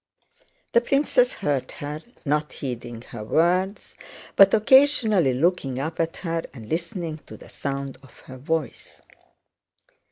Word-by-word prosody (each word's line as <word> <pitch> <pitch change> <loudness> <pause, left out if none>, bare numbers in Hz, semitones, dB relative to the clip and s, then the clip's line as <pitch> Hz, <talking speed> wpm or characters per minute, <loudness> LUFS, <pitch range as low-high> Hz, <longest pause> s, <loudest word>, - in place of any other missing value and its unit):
The 235 - +5
princess 250 -1 +2
heard 145 -9 -2
her, 150 +1 -6 0.2
not 150 +1 0
heeding 120 -3 -6
her 115 -4 -8
words 180 - +1 0.4
but 195 -1 +8
occasionally 220 - +4
looking 140 -3 0
up 150 +5 -4
at 165 0 -1
her 165 0 -1
and 110 -4 -10
listening 165 - -3
to - - -10
the - - -15
sound 140 -1 -5
of 135 - -18
her 130 - -11
voice. 155 +2 -4
160 Hz, 130 wpm, -24 LUFS, 135-190 Hz, 0.4 s, but